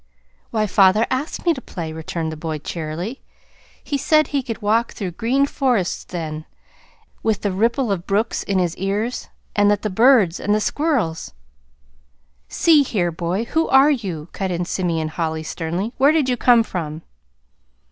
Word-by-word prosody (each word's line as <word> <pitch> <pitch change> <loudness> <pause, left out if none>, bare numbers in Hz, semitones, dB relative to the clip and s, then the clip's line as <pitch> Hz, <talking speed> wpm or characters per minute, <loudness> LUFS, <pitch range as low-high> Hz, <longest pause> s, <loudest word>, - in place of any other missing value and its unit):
"Why, 215 -1 0
father 200 +2 +4
asked 265 +7 -3
me 340 - +4
to 265 - -7
play" 165 -8 -6
returned 160 0 -4
the - - -6
boy 155 0 -4
cheerily. 165 - -5 0.6
"He 280 - -2
said 310 +1 +3
he 285 -2 0
could 230 -3 -5
walk 225 +2 +1
through 190 -4 -4
green 240 +9 +1
forests 250 -10 0
then, 155 -3 -5 0.8
with 220 -3 0
the 205 - 0
ripple 230 +5 +1
of 185 -2 -3
brooks 210 +3 0
in 200 - -1
his 175 -2 0
ears, 205 +6 -2 0.3
and 205 -1 +4
that 205 -1 +1
the 215 - -1
birds 220 -5 +4
and 205 - +1
the - - +2
squirrels 220 - -1 0.6
" - - -40
"See 320 -3 +7
here, 190 -10 0
boy, 175 +6 -2
who 320 +7 0
are 270 +3 +6
you?" 180 - -3
cut 190 -1 -3
in 175 0 -2
Simeon 170 -4 -1
Holly 160 -1 -3
sternly. 175 +8 -3
"Where 280 +3 +6
did 310 -4 +2
you 250 - +2
come 240 -1 +5
from?" 160 -6 -5
200 Hz, 170 wpm, -21 LUFS, 165-240 Hz, 0.8 s, See